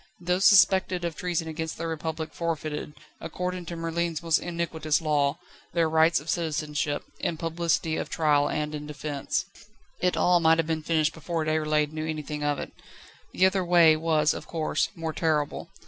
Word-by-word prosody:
Those 180 Hz, +2 st, 0 dB
suspected 190 Hz, -3 st, +5 dB
of 170 Hz, -2 st, -3 dB
treason 175 Hz, -1 st, -2 dB
against 160 Hz, 0 st, -4 dB
the 165 Hz, -, -4 dB
Republic 160 Hz, -1 st, -4 dB
forfeited, 155 Hz, -3 st, -3 dB, 0.2 s
according 180 Hz, -1 st, -4 dB
to 170 Hz, -, -5 dB
Merlin's 165 Hz, 0 st, -2 dB
most 165 Hz, -1 st, +3 dB
iniquitous 165 Hz, -3 st, -1 dB
Law, 150 Hz, -2 st, +1 dB, 0.4 s
their 165 Hz, -1 st, +2 dB
rights 160 Hz, 0 st, +4 dB
of 145 Hz, -, -13 dB
citizenship, 155 Hz, -3 st, -1 dB, 0.2 s
in 165 Hz, -, -2 dB
publicity 165 Hz, -1 st, -1 dB
of -, -, -4 dB
trial 150 Hz, -3 st, +2 dB
and 150 Hz, 0 st, -2 dB
in 150 Hz, 0 st, -6 dB
defence. 145 Hz, -1 st, -3 dB, 0.5 s
It 180 Hz, 0 st, +1 dB
all 180 Hz, 0 st, +4 dB
might 165 Hz, -1 st, +4 dB
have 165 Hz, -, +1 dB
been 160 Hz, 0 st, -2 dB
finished 155 Hz, -1 st, +1 dB
before 160 Hz, 0 st, -3 dB
Déroulède 155 Hz, -1 st, +1 dB
knew 155 Hz, 0 st, -3 dB
anything 150 Hz, -1 st, -4 dB
of 145 Hz, -1 st, +1 dB
it. -, -, -6 dB, 0.6 s
The 185 Hz, -, +3 dB
other 190 Hz, 0 st, +2 dB
way 170 Hz, -3 st, +6 dB
was, 155 Hz, -1 st, +2 dB
of -, -, -8 dB
course, 160 Hz, -2 st, -1 dB
more 165 Hz, -1 st, -4 dB
terrible. 155 Hz, -3 st, -1 dB
160 Hz, 170 wpm, -27 LUFS, 155-170 Hz, 0.6 s, way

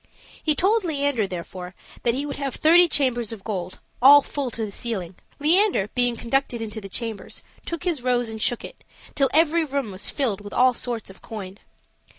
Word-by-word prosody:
He 305 Hz, -2 st, +1 dB
told 415 Hz, +6 st, +2 dB
Leander, 285 Hz, -, 0 dB
therefore, 180 Hz, 0 st, -7 dB, 0.3 s
that 235 Hz, 0 st, +1 dB
he 280 Hz, +2 st, -2 dB
would 285 Hz, -, -5 dB
have 275 Hz, -2 st, -3 dB
thirty 345 Hz, +3 st, +6 dB
chambers 245 Hz, -7 st, +1 dB
of 215 Hz, -4 st, -8 dB
gold, 185 Hz, -4 st, -4 dB, 0.2 s
all 285 Hz, +2 st, +9 dB
full 280 Hz, -3 st, -3 dB
to 225 Hz, -1 st, -3 dB
the 205 Hz, -, -7 dB
ceiling. 195 Hz, -6 st, -4 dB, 0.3 s
Leander, 320 Hz, -, +3 dB
being 245 Hz, -1 st, +2 dB
conducted 245 Hz, +1 st, -1 dB
into 220 Hz, -1 st, -5 dB
the 195 Hz, -, -9 dB
chambers, 225 Hz, -1 st, -5 dB, 0.2 s
took 335 Hz, 0 st, -4 dB
his 340 Hz, -7 st, -1 dB
rose 245 Hz, -1 st, +1 dB
and 220 Hz, -1 st, -6 dB
shook 240 Hz, -, +1 dB
it, -, -, -12 dB, 0.3 s
till 275 Hz, -2 st, +2 dB
every 325 Hz, +2 st, +3 dB
room 280 Hz, -7 st, -3 dB
was 190 Hz, 0 st, -2 dB
filled 230 Hz, -8 st, 0 dB
with 205 Hz, 0 st, -9 dB
all 255 Hz, 0 st, +4 dB
sorts 235 Hz, -4 st, -3 dB
of 190 Hz, -, -18 dB
coin. 200 Hz, -2 st, -8 dB
245 Hz, 190 wpm, -24 LUFS, 215-285 Hz, 0.3 s, all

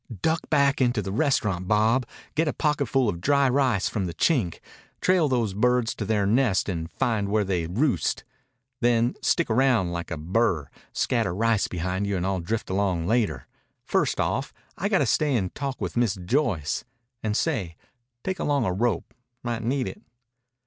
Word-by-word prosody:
"Duck 160 Hz, +1 st, 0 dB
back 140 Hz, -2 st, +3 dB
into 120 Hz, -4 st, +2 dB
the 95 Hz, -, -4 dB
restaurant, 105 Hz, -, 0 dB
Bob. 110 Hz, +4 st, +2 dB, 0.3 s
Get 160 Hz, +1 st, +1 dB
a -, -, 0 dB
pocketful 140 Hz, -4 st, +1 dB
of 85 Hz, -4 st, -2 dB
dry 140 Hz, +2 st, +3 dB
rice 130 Hz, -6 st, +2 dB
from 100 Hz, -4 st, -2 dB
the 85 Hz, -, -6 dB
Chink. 115 Hz, -, +1 dB, 0.4 s
Trail 180 Hz, -4 st, +3 dB
those 115 Hz, -6 st, 0 dB
birds 125 Hz, +2 st, +2 dB
to -, -, -5 dB
their 105 Hz, -3 st, +1 dB
nest 110 Hz, -1 st, +2 dB
and 85 Hz, -4 st, -3 dB
find 110 Hz, -3 st, -1 dB
where 105 Hz, 0 st, +2 dB
they 90 Hz, -4 st, -1 dB
roost. 125 Hz, -, 0 dB, 0.6 s
Then 120 Hz, 0 st, +2 dB
stick 170 Hz, -, +2 dB
around 115 Hz, -6 st, +2 dB
like 85 Hz, -1 st, -4 dB
a 80 Hz, -, -3 dB
burr. 85 Hz, -, 0 dB, 0.2 s
Scatter 110 Hz, -8 st, 0 dB
rice 115 Hz, 0 st, +2 dB
behind 90 Hz, +3 st, -2 dB
you, 100 Hz, -1 st, 0 dB
and 90 Hz, -, -2 dB
I'll 95 Hz, -1 st, 0 dB
drift 100 Hz, +4 st, -3 dB
along 95 Hz, -4 st, 0 dB
later. 95 Hz, -, 0 dB, 0.4 s
First -, -, +1 dB
off, -, -, -1 dB, 0.2 s
I -, -, -2 dB
got -, -, +3 dB
to -, -, +2 dB
stay 150 Hz, -3 st, +2 dB
and 95 Hz, -4 st, -2 dB
talk 135 Hz, -2 st, -4 dB
with -, -, -4 dB
Miss 120 Hz, -5 st, +2 dB
Joyce. 100 Hz, -, 0 dB, 0.4 s
And, 110 Hz, -1 st, -1 dB
say, 105 Hz, -, -1 dB, 0.5 s
take 190 Hz, 0 st, -3 dB
along 140 Hz, -5 st, +1 dB
a 90 Hz, -, 0 dB
rope. 110 Hz, -1 st, -1 dB, 0.3 s
Might 120 Hz, -1 st, -2 dB
need 130 Hz, +3 st, 0 dB
it." 210 Hz, -, -8 dB
110 Hz, 175 wpm, -25 LUFS, 95-130 Hz, 0.6 s, back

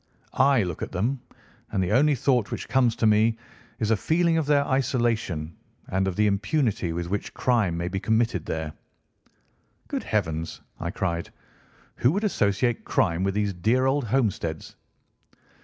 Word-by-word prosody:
I 135 Hz, -4 st, +4 dB
look 90 Hz, -4 st, -5 dB
at -, -, -4 dB
them, 120 Hz, +8 st, -1 dB, 0.5 s
and 95 Hz, -3 st, +1 dB
the 90 Hz, -, -1 dB
only 145 Hz, +6 st, +4 dB
thought 125 Hz, -3 st, +1 dB
which -, -, -5 dB
comes 125 Hz, -3 st, +2 dB
to 115 Hz, -, 0 dB
me 110 Hz, +1 st, +4 dB, 0.4 s
is 110 Hz, -1 st, 0 dB
a -, -, +5 dB
feeling 165 Hz, -, +1 dB
of 160 Hz, -3 st, 0 dB
their 145 Hz, -1 st, +3 dB
isolation 115 Hz, -, 0 dB, 0.3 s
and 95 Hz, +1 st, 0 dB
of 95 Hz, -, -2 dB
the 105 Hz, -, +2 dB
impunity 105 Hz, -, 0 dB
with 85 Hz, +1 st, -3 dB
which 100 Hz, +3 st, -4 dB
crime 110 Hz, -9 st, +1 dB
may 85 Hz, +1 st, -2 dB
be 95 Hz, +2 st, -2 dB
committed 110 Hz, -5 st, +1 dB
there." 80 Hz, -1 st, -3 dB, 1.1 s
"Good -, -, -3 dB
heavens!" 80 Hz, -6 st, -2 dB, 0.2 s
I 85 Hz, -, -3 dB
cried. 85 Hz, -2 st, -2 dB, 0.7 s
"Who 125 Hz, -, +3 dB
would 200 Hz, +3 st, -1 dB
associate 115 Hz, -, +1 dB
crime 85 Hz, 0 st, +1 dB
with 95 Hz, 0 st, 0 dB
these 105 Hz, -1 st, 0 dB
dear 115 Hz, +9 st, +1 dB
old 135 Hz, 0 st, +1 dB
homesteads?" 100 Hz, -, -1 dB
105 Hz, 160 wpm, -25 LUFS, 90-130 Hz, 1.1 s, a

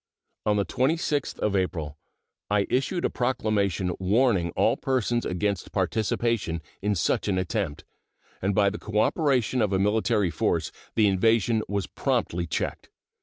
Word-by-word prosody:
On 105 Hz, -, +3 dB
the 100 Hz, -, +1 dB
26th 145 Hz, +1 st, 0 dB
of 105 Hz, -1 st, +1 dB
April 80 Hz, -6 st, -1 dB, 0.5 s
I 100 Hz, -1 st, +2 dB
issued 170 Hz, +7 st, 0 dB
a -, -, +2 dB
proclamation 105 Hz, -7 st, 0 dB
warning 100 Hz, -2 st, +2 dB
all -, -, +3 dB
persons 120 Hz, -2 st, 0 dB
against 95 Hz, 0 st, -2 dB
participation 110 Hz, -6 st, 0 dB, 0.2 s
in 105 Hz, +1 st, +1 dB
such 85 Hz, -, 0 dB
an 95 Hz, -2 st, +1 dB
attempt, 95 Hz, -4 st, -2 dB, 0.6 s
and 95 Hz, +1 st, 0 dB
by 100 Hz, -2 st, +4 dB
the 105 Hz, -, -6 dB
cooperation 125 Hz, -, +1 dB
of 105 Hz, -2 st, +1 dB
a 95 Hz, -, +2 dB
military 105 Hz, -1 st, +2 dB
force -, -, 0 dB, 0.2 s
the 110 Hz, -, +4 dB
invasion 110 Hz, +3 st, +3 dB
was 100 Hz, -2 st, -1 dB
promptly 85 Hz, +1 st, -1 dB
checked. 75 Hz, -, -3 dB
105 Hz, 140 wpm, -26 LUFS, 95-115 Hz, 0.6 s, by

